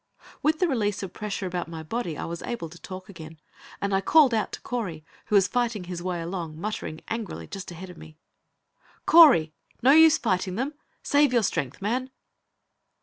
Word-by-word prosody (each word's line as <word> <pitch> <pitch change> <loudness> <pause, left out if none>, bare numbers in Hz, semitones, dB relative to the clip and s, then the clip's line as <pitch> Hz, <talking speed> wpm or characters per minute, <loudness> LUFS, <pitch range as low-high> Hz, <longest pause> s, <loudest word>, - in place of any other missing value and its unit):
With 310 +1 +2
the 360 - +2
release 210 - -1
of 185 -2 -6
the - - -15
pressure 210 -2 -3
about 180 -2 -3
my 165 -1 -7
body 170 -2 -3
I - - -4
was 170 0 -6
able 235 -9 -5
to 175 +2 -14
talk 185 0 -8
again, 160 -4 -11 0.4
and 200 0 -2
I 195 - +2
called 290 +2 +5
out 220 -2 0
to - - -6
Correy, 185 -11 -4 0.2
who 210 - 0
was 195 -2 +5
fighting 235 -5 -1
his 175 -1 -6
way 180 -1 -3
along, 165 -3 -5
muttering, 175 -5 -5
angrily, 225 -3 -5
just 195 -1 -8
ahead 180 +2 -9
of 175 - -14
me. 155 -1 -13 0.9
"Correy! 265 - +7 0.3
No 260 - +7
use 320 +1 +7
fighting 185 -4 -1
them. 265 +7 -2 0.3
Save 285 -2 +3
your 235 -2 +3
strength, 165 -3 -2
man!" 250 +5 -1
195 Hz, 195 wpm, -26 LUFS, 170-240 Hz, 0.9 s, Correy